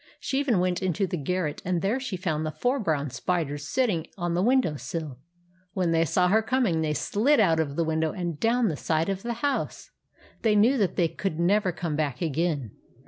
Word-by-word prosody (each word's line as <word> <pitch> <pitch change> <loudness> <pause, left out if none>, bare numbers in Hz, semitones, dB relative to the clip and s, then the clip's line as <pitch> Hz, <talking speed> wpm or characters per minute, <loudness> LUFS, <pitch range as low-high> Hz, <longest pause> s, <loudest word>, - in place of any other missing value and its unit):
She 270 - -1
even 270 -7 +2
went 180 0 0
into 185 +1 0
the 185 - -3
garret, 165 0 -2
and 180 -2 -1
there 215 +7 +1
she 255 -8 -4
found 160 -4 -2
the 155 - -1
four 250 - 0
brown 150 - -1
spiders 145 +1 -2
sit 260 0 +2
ting 170 -8 -1
on 175 -2 -1
the 175 - +1
window 245 - +2
sill. 150 -3 -5 0.5
When 180 -3 0
they 165 0 +3
saw 180 +3 +2
her 220 +4 +4
coming, 220 -8 +1
they 150 -1 0
slid 255 - +2
out 165 -6 +4
of 145 -3 -1
the 170 - +1
window 160 0 0
and 175 -5 -4
down 230 +2 +2
the 155 - -2
side 160 +4 0
of 195 -1 -2
the 235 +2 -3
house. 285 - -2 0.5
They 220 -2 +3
knew 235 +6 +4
that 200 -4 +1
they 175 - +3
could 165 0 -4
never 190 +2 +2
come 165 -2 -3
back 145 -4 -1
again. 155 - -1
175 Hz, 215 wpm, -26 LUFS, 160-210 Hz, 0.5 s, her